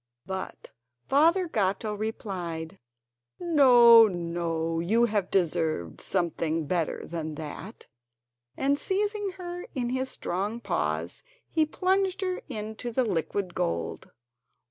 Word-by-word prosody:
But 190 0 -6 0.4
Father 335 +6 +4
Gatto 210 - 0
replied: 190 -5 -5 0.6
"No, 245 -9 +7
no; 170 -2 -2
you 220 +8 +3
have 205 -5 -1
deserved 160 - 0
something 165 -3 -1
better 170 0 -1
than 160 -2 -5
that." 155 +8 -8 0.7
And 280 +1 +1
seizing 410 0 -1
her 355 -1 -6
in 245 -2 -1
his 260 +1 -1
strong 200 +6 -3
paws - - -2 0.3
he 315 -1 +1
plunged 380 +3 0
her 370 -1 -2
into 220 +3 -5
the 255 +2 +1
liquid 180 0 -2
gold. 85 - -3
210 Hz, 110 wpm, -27 LUFS, 170-280 Hz, 0.7 s, No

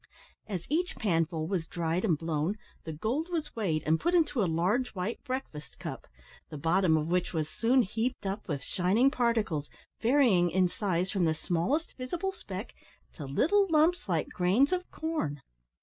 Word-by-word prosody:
As 185 -5 -4
each 350 +5 0
panful 165 -5 0
was 175 -4 -2
dried 170 +1 -1
and 175 -9 +2
blown, 160 +5 -1 0.3
the 160 - -4
gold 240 - -2
was 330 -3 -3
weighed, 170 -9 0
and 160 +1 +3
put 345 +2 +1
into 295 -7 +2
a 185 - +2
large 190 +11 0
white 185 +5 -3
breakfast 255 - -6
cup, - - -7 0.4
the 150 - -7
bottom 165 +2 +3
of 155 +1 -2
which 180 +1 0
was 155 -2 -1
soon 245 +7 +3
heaped 225 +4 -2
up 195 +2 -3
with 145 -5 -3
shining 200 - +2
particles, 220 - 0 0.3
varying 230 -8 +4
in 185 +1 +3
size 185 -1 -1
from 190 -4 +1
the 160 -1 +2
smallest 185 - -1
visible 340 +9 -2
speck, 385 - -7 0.4
to 150 - -7
little 390 - +3
lumps 320 - +3
like 165 -4 0
grains 195 +11 +3
of 365 0 -2
corn. 305 - -3
190 Hz, 170 wpm, -30 LUFS, 165-260 Hz, 0.4 s, varying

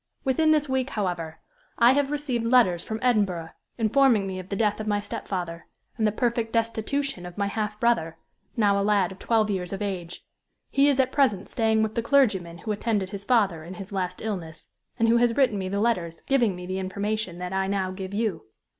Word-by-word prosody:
Within 310 +4 +2
this 305 -1 +3
week, 265 0 0
however, 175 -7 -3 0.4
I 235 +1 +6
have 285 0 +1
received 285 -5 -2
letters 210 -9 +4
from 220 - -4
Edinburgh, 195 -9 +1 0.3
informing 230 -1 +3
me 190 -1 -4
of 185 +1 -9
the 200 - -2
death 210 0 +1
of 215 - -4
my 205 -1 +2
stepfather, 180 -4 -5 0.3
and 220 - +1
the - - +2
perfect 235 0 -1
destitution 230 +1 -1
of 180 +1 -9
my 200 - +1
half 210 +1 -3
brother, 165 -9 +1 0.4
now 200 -3 +3
a - - +1
lad 200 -3 +2
of 190 - -11
twelve 220 -2 +1
years 180 -3 -3
of 195 +1 -3
age. 180 -4 -5 0.5
He 275 +1 +4
is 280 -2 +2
at 260 -1 +3
present 220 -9 +1
staying 220 -1 +2
with 220 0 -2
the 230 - 0
clergyman 210 -10 +2
who 215 +5 -4
attended 205 -2 -1
his 200 -1 -6
father 200 -10 +2
in 175 +3 -8
his 195 +3 -8
last 180 -1 -3
illness, 175 -8 -5 0.3
and 230 -1 +2
who 230 +1 +5
has 235 -1 +2
written 245 -7 +3
me 185 -1 -3
the 200 +1 -1
letters 180 -7 -1
giving 240 -8 +2
me 180 0 -8
the 185 +1 -3
information 200 0 -3
that 180 +1 -5
I 190 0 0
now 195 -1 -1
give 190 0 -6
you. 200 - -2
210 Hz, 210 wpm, -26 LUFS, 185-235 Hz, 0.5 s, I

